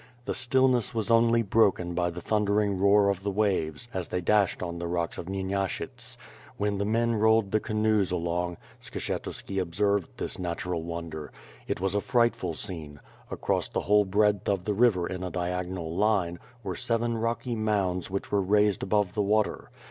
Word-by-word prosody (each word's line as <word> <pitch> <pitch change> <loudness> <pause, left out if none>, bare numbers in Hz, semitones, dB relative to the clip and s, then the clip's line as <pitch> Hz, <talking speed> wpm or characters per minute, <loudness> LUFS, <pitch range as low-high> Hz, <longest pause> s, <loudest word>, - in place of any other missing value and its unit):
The - - -1
stillness 130 -1 +2
was 110 -1 -1
only 115 0 +4
bn>kon 100 -4 +2
by 90 0 +1
the 90 +1 -7
thundering 105 0 +1
roar 100 +1 +5
of 100 -2 0
the 100 - -2
waves 100 -1 0
a? 95 - -1
they 90 +1 -3
dashed 100 +1 +2
on 85 -1 -4
the 85 - -3
nH*ks 85 -1 -2
of 85 - -6
Xyenashyts. 95 0 -3 0.4
While 105 0 0
the 100 - -1
men 115 +2 +2
rolled 110 -2 +3
the 110 - +3
canoes 110 -2 +1
along, 85 0 -1 0.2
Skshetuski 95 -1 -4
observed 100 +2 0
this - - -2
natural 90 -1 -3
wonder. 85 -2 -6 0.4
It - - -2
was 95 +1 -1
a 105 - +1
frightful 115 -9 +1
soi»ne. 80 -6 -6 0.3
Across - - -1
the - - -1
whole 105 +1 +4
breadth 105 +1 +2
of 95 -3 0
the 105 - 0
river 100 -5 +3
in 90 +1 -4
a 90 - -3
diagonal 90 -1 -3
line, 95 -4 +1 0.2
were 95 -2 -3
seven 115 0 0
rooky 115 +2 -2
mounds 100 -5 0
vhieh 95 +1 -4
were 100 -1 +3
raised 105 +1 +2
above 100 -2 +1
the 105 - 0
water. 105 +1 0
100 Hz, 175 wpm, -28 LUFS, 90-110 Hz, 0.4 s, roar